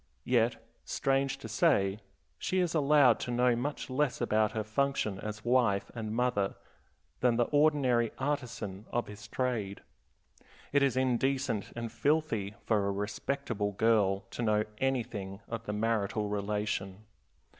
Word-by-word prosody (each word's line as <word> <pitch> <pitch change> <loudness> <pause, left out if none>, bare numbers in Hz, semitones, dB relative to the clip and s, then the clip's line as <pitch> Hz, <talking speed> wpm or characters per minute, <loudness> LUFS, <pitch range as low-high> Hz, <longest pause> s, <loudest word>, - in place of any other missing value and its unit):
Yet, 120 -1 +3 0.3
strange 135 0 0
to 135 - -8
say, 105 - +2 0.4
she 185 - -1
is 180 -2 +1
allowed 145 -5 +5
to - - -4
know 125 0 +3
much 140 +5 -3
less 135 +1 0
about 110 -2 +2
her 110 -2 -1
function 110 -3 0
as 105 0 -6
wife 120 -5 +2
and 110 -2 -4
mother 120 -5 +1 0.6
than 125 -2 +3
the 120 - +3
ordinary 140 -6 +3
artisan 125 -8 -3
of 120 - -1
his 105 +2 -10
trade. 115 -5 -2 0.9
It 145 - +4
is 135 -2 +2
indecent 130 -3 0
and 115 -1 -4
filthy 115 -5 0
for 105 -3 +2
a - - +1
respectable 105 +1 -2
girl 100 -2 +3
to - - -5
know 105 -2 +2 0.2
anything 105 -7 -2
of 115 0 -6
the 105 - -2
marital 105 -1 0
relation. 105 -1 -2
115 Hz, 140 wpm, -31 LUFS, 105-130 Hz, 0.9 s, allowed